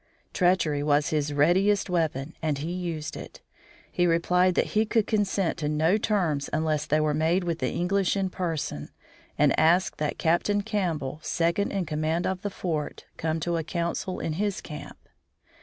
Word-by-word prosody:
Treachery 175 -5 +2
was 145 0 +2
his 150 -1 0
readiest 185 +8 +3
weapon 160 -4 -1
and 155 -3 0
he 155 +5 -4
used 170 -4 -4
it. - - -9 0.5
He 175 0 +2
replied 180 +2 +3
that - - +1
he 215 - +4
could 220 -1 +1
consent 200 -5 0
to 150 -2 -1
no 160 +7 +2
terms 170 -11 0
unless 155 -1 0
they 155 - +2
were 155 -1 +1
made 165 +5 +1
with 170 -1 -2
the - - 0
English 195 +2 0
in 190 -1 -1
person, 160 - -3 0.5
and - - +4
asked 175 +4 +3
that 150 -1 -1
Captain 200 +5 +1
Campbell, 170 -10 -2
second 170 +5 0
in 195 -3 -1
command 155 +2 -1
at 185 -1 -2
the 205 - -2
fort, 165 -6 -4
come 160 0 -1
to 170 +1 0
a 165 - -2
council 170 +3 -3
in 160 - -2
his 200 +3 -1
camp. 150 - -9
170 Hz, 175 wpm, -26 LUFS, 155-185 Hz, 0.5 s, he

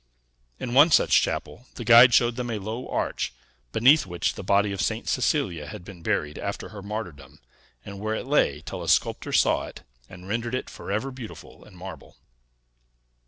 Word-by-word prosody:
In 120 - -4
one 145 +6 +7
such - - +5
chapel, 125 - -4
the 120 - -6
guide 120 +2 +8
showed 120 0 +3
them 125 -1 -4
a 110 - -2
low 110 +5 -5
arch, - - -2 0.4
beneath 130 - +5
which 85 -1 -1
the - - -8
body 100 +1 +2
of 100 -1 -3
St. 110 +1 -2
Cecilia 115 - 0
had 100 -1 -9
been 95 -4 -11
buried 75 -2 -2
after 100 0 -5
her 105 -2 -9
martyrdom, 100 -7 -7 0.5
and 100 -1 -8
where 110 +1 -2
it - - -5
lay 135 - +1
till - - -6
a - - -4
sculptor - - +1
saw - - +2
it, - - -12 0.3
and 90 +1 -12
rendered 115 +4 -2
it 130 - -5
forever 110 +7 -4
beautiful 125 -4 -11
in 100 - -17
marble. 90 -2 -10
110 Hz, 180 wpm, -25 LUFS, 95-120 Hz, 0.5 s, guide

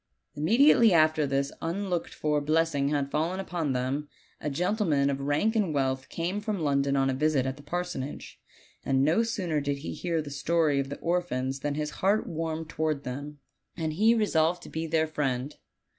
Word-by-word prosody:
Immediately 230 - +5
after 155 -2 +4
this 140 0 0
unlooked 175 +1 -2
for 150 -1 0
blessing 155 -2 +1
had 140 -2 -1
fallen 165 +5 0
upon 170 -7 -2
them, 130 +4 -2 0.3
a 150 - -3
gentleman 160 -3 +1
of 135 - -3
rank 150 +11 +1
and 195 -9 +1
wealth 130 -1 -1
came 180 +5 -2
from 210 -2 -2
London 140 -2 +1
on 135 -1 +2
a - - -1
visit 145 -1 +1
at 130 0 -2
the 145 - -13
parsonage; 150 -3 -5 0.4
and 135 0 +2
no 160 +9 +3
sooner 185 -9 -1
did 140 0 -1
he 140 - -6
hear 170 -2 -2
the 150 -2 -5
story 150 0 +1
of 135 0 -2
the 145 - -5
orphans 140 -7 -1
than 145 +1 -2
his 150 0 -2
heart 200 +3 +3
warmed 160 0 -3
toward 155 -2 -2
them, 140 +4 -6 0.4
and 160 -2 -2
he 220 +7 +4
resolved 175 -6 +1
to - - -10
be 160 +1 -3
their 160 0 +2
friend. 140 -3 -2
155 Hz, 185 wpm, -28 LUFS, 140-175 Hz, 0.4 s, Immediately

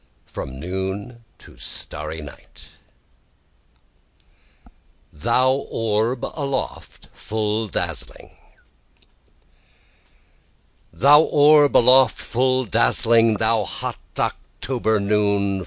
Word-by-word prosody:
FROM 65 0 -8
NOON 95 - -6
TO - - -18
STARRY 75 +1 -6
NIGHT 75 - -14 2.4
Thou 130 - +1
Orb 115 +2 -1
Aloft 140 -3 -5
Full 110 0 -3
Dazzling 95 - -6 2.6
Thou 140 - +5
orb 150 -1 +4
aloft 130 0 +5
full 130 +1 0
dazzling! 115 +3 +2
thou 110 0 +1
hot 95 - -5 0.2
October 110 -4 -2
noon! 100 -1 0
110 Hz, 75 wpm, -21 LUFS, 100-130 Hz, 2.6 s, Thou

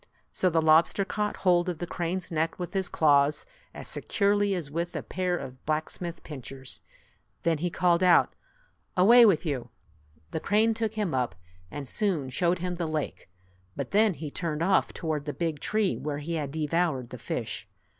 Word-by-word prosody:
So 185 - +2
the 165 -1 +2
lobster 160 +5 +4
caught 210 +1 -2
hold 180 -1 +3
of 175 - -3
the 175 - -4
crane's 175 +2 -3
neck 165 0 0
with 180 +1 -5
his 190 -2 -1
claws 145 -1 +3 0.3
as - - -8
securely 205 -1 +1
as 155 -5 -5
with 170 +3 -3
a - - -3
pair 180 -1 -1
of 130 -4 -9
black 155 0 -1
smith's 175 -1 -6
pincers. 135 -2 -6 0.6
Then 165 -2 +1
he 175 +3 0
called 175 0 +2
out, 180 -2 +5 0.6
"Away 230 +6 +8
with 185 -4 +2
you! 140 -6 -2 0.3
" 75 +1 -33
The - - -2
crane 215 +6 +3
took 220 -1 -2
him 210 -7 -1
up, 125 -7 0 0.3
and 145 +4 -6
soon 170 -11 0
showed 175 +6 +1
him 180 0 -3
the 170 -1 -2
lake, 155 -10 -4 0.5
but - - -4
then 210 -2 +4
he 155 -2 -6
turned 165 -1 -2
off 190 +2 +3
toward 155 -4 -3
the 145 - -3
big 165 -4 -2
tree 215 +2 +1
where 150 -1 -3
he 155 +3 -4
had 150 -4 -2
devoured 155 -3 -1
the - - -7
fish. - - -4
170 Hz, 185 wpm, -28 LUFS, 150-185 Hz, 0.6 s, Away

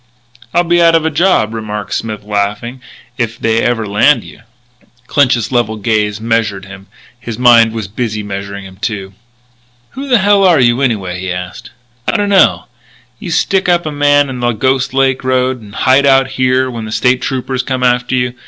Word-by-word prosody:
"I'll 175 - +2
be 175 0 +2
out 165 -1 +5
of 160 -1 +1
a 160 - 0
job," 155 - +1
remarked 105 -2 -5
Smith, 110 -2 -4
laughing, 105 +5 -3 0.4
"if 115 -1 -2
they 115 0 0
ever 120 -2 0
land 110 +5 +2
you." - - -14 0.7
Clinch's 130 -5 +1
level 120 -3 0
gaze 105 -1 -1
measured 110 -4 -1
him; 100 0 -12 0.3
his 115 -3 -7
mind 120 -2 +5
was 110 -3 -5
busy 110 0 -4
measuring 100 0 -6
him, 95 -1 -13
too. 100 -2 -5 0.8
"Who 275 +2 -7
the 250 - +5
hell 200 0 +3
are 180 -5 +4
you, 120 +1 +2
anyway?" 100 -9 -1
he 95 0 -4
asked. 90 0 -7 0.4
"I - - +1
don't 205 -1 -1
know. 195 -2 +3 0.5
You - - -7
stick 190 +3 +1
up 175 -1 +2
a 155 - -3
man 145 0 +2
on 130 -2 -6
the 120 0 +1
Ghost 130 +3 0
Lake 135 -1 +1
Road 130 -1 0
and 105 -1 -13
hide 135 +2 +3
out 135 -1 +4
here 130 0 0
when 115 -2 -6
the 110 - -7
State 125 +2 +1
Troopers 130 -1 -2
come 130 0 -3
after 125 0 +1
you. 125 -1 -1
120 Hz, 190 wpm, -13 LUFS, 105-135 Hz, 0.8 s, out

